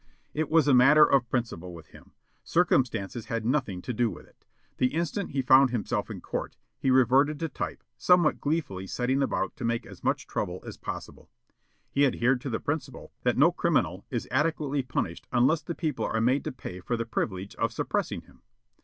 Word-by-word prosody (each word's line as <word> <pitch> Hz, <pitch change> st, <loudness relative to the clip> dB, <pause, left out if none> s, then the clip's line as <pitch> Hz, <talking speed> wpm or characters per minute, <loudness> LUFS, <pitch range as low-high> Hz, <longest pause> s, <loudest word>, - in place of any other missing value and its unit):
It 155 Hz, -1 st, -1 dB
was 160 Hz, -2 st, +4 dB
a 140 Hz, -, +5 dB
matter 135 Hz, +5 st, +7 dB
of 130 Hz, -4 st, +2 dB
principle 90 Hz, -9 st, -3 dB
with 80 Hz, -2 st, -13 dB
him. -, -, -17 dB, 0.3 s
Circumstances 120 Hz, -, +1 dB
had 115 Hz, -1 st, -3 dB
nothing 120 Hz, -8 st, -1 dB
to 125 Hz, -, -3 dB
do 120 Hz, +1 st, +1 dB
with -, -, -10 dB
it. -, -, -28 dB, 0.3 s
The 125 Hz, +3 st, +1 dB
instant 170 Hz, +4 st, -2 dB
he 135 Hz, -1 st, -1 dB
found 130 Hz, +1 st, +6 dB
himself 120 Hz, -4 st, -2 dB
in -, -, -7 dB
court, -, -, -5 dB, 0.2 s
he 135 Hz, -, 0 dB
reverted 130 Hz, +4 st, +4 dB
to 165 Hz, -, -2 dB
type, -, -, -5 dB, 0.2 s
somewhat 180 Hz, -3 st, +4 dB
gleefully 140 Hz, -, -2 dB
setting 130 Hz, +6 st, 0 dB
about 135 Hz, -, -1 dB
to 130 Hz, -, -7 dB
make 115 Hz, 0 st, -1 dB
as -, -, -13 dB
much -, -, 0 dB
trouble -, -, -4 dB
as -, -, -7 dB
possible. -, -, -8 dB, 0.6 s
He 140 Hz, 0 st, +4 dB
adhered 125 Hz, 0 st, +1 dB
to 135 Hz, -, -4 dB
the 110 Hz, -, -2 dB
principle 145 Hz, -3 st, -4 dB
that 125 Hz, -, +1 dB
no 155 Hz, +6 st, +6 dB
criminal 100 Hz, -, 0 dB
is 120 Hz, -3 st, -3 dB
adequately 145 Hz, 0 st, 0 dB
punished 125 Hz, -9 st, -4 dB
unless 130 Hz, +6 st, +3 dB
the 165 Hz, +2 st, -5 dB
people 155 Hz, -6 st, -2 dB
are 110 Hz, -, -1 dB
made 125 Hz, +5 st, +2 dB
to 155 Hz, -, -2 dB
pay 90 Hz, -8 st, -8 dB
for 120 Hz, +6 st, -2 dB
the 115 Hz, -, -2 dB
privilege 100 Hz, -3 st, -3 dB
of -, -, 0 dB
suppressing -, -, -2 dB
him. -, -, -22 dB
130 Hz, 195 wpm, -27 LUFS, 115-150 Hz, 0.6 s, matter